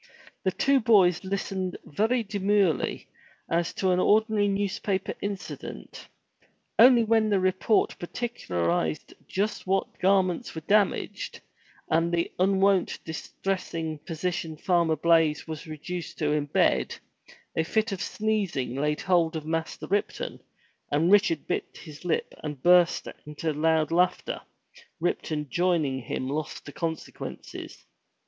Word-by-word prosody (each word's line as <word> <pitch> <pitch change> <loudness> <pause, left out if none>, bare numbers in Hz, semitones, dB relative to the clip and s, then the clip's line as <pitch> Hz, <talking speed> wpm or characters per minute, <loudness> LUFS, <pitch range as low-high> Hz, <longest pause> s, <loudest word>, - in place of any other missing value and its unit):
The 190 - +2
two 275 +8 +3
boys 200 -7 +5
Ustened 190 -1 -3
very 225 - +1
demurely 200 -5 +1 0.4
as 170 0 +1
to 190 -1 +1
an 180 - +2
ordinary 215 +1 +3
newspaper 195 -1 -1
incident; 170 - -6 0.7
only 240 0 +8
when 220 -1 +3
the 200 -2 +3
report 185 +3 +1
particularized 90 - -2
just 205 0 -2
what 195 +1 -1
garments 185 -3 +2
were 160 - -4
damaged, 205 +4 0 0.5
and 165 +1 +2
the 170 0 0
unwonted 195 0 +2
distressing 165 -1 -4
position 165 -1 -3
Farmer 170 -1 +2
Blaize 165 -1 +3
was 160 0 -6
reduced 165 +3 -6
to 150 -2 0
in 150 -1 0
bed, - - +2 0.6
a 160 - +2
fit 220 +6 0
of 190 -2 -4
sneezing 205 - -1
laid 150 +3 -1
hold 175 -3 +2
of 155 -1 -4
Master 160 0 -3
Ripton, 205 - -2 0.5
and 160 +5 +3
Richard 200 -7 +4
bit - - -3
his 155 -2 -11
lip 175 - -1
and 150 -4 -6
burst 175 -1 +5 0.2
into 150 +1 -3
loud 160 +1 +2
laughter, 180 +2 +1 0.6
Ripton 155 -3 -1
joining 170 -7 +1
him 130 +2 -4
lost 150 +3 -4
to 145 - -8
consequences. 160 +1 -6
175 Hz, 125 wpm, -27 LUFS, 155-200 Hz, 0.7 s, only